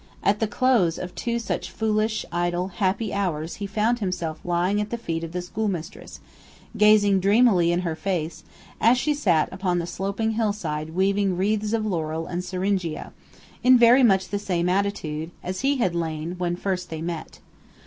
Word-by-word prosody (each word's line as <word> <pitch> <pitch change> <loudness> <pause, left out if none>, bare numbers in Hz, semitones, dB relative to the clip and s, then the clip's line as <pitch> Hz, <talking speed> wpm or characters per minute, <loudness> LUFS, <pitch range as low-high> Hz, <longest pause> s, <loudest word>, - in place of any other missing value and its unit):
At 205 +1 +2
the 220 - +1
close 215 -8 +2
of 180 0 -6
two 235 -1 -2
such 230 - -3
foolish, 215 0 0
idle, 175 +1 -1
happy 195 +3 -1
hours 175 -5 -2
he 200 - -4
found 220 +4 +1
himself 175 -6 -3
lying 180 +4 +1
at 210 - -4
the 235 - -3
feet 165 -7 -4
of 165 - -5
the 180 0 -3
schoolmistress, 185 -3 -4 0.6
gazing 210 -2 +5
dreamily 200 -3 +4
in 175 +1 +1
her 170 -3 -2
face, 170 -2 -3 0.4
as 235 +3 +5
she 300 +4 +1
sat 180 - +2
upon 185 -2 -1
the 170 - -1
sloping 200 +5 -2
hillside 175 -8 -2
weaving 195 0 +1
wreaths 210 +2 0
of 225 -1 0
laurel 165 -4 -2
and 175 +2 -4
syringa, 185 -2 -2 0.5
in 255 +1 +7
very 240 +2 +6
much 195 -6 +3
the 205 - -2
same 180 -3 -1
attitude 180 -5 -1
as 185 +1 -4
he 275 +2 +2
had 185 -8 +1
lain 160 -1 -3
when 175 -1 0
first 180 -1 -3
they 160 0 -5
met. 170 -2 -5
190 Hz, 175 wpm, -24 LUFS, 175-215 Hz, 0.6 s, in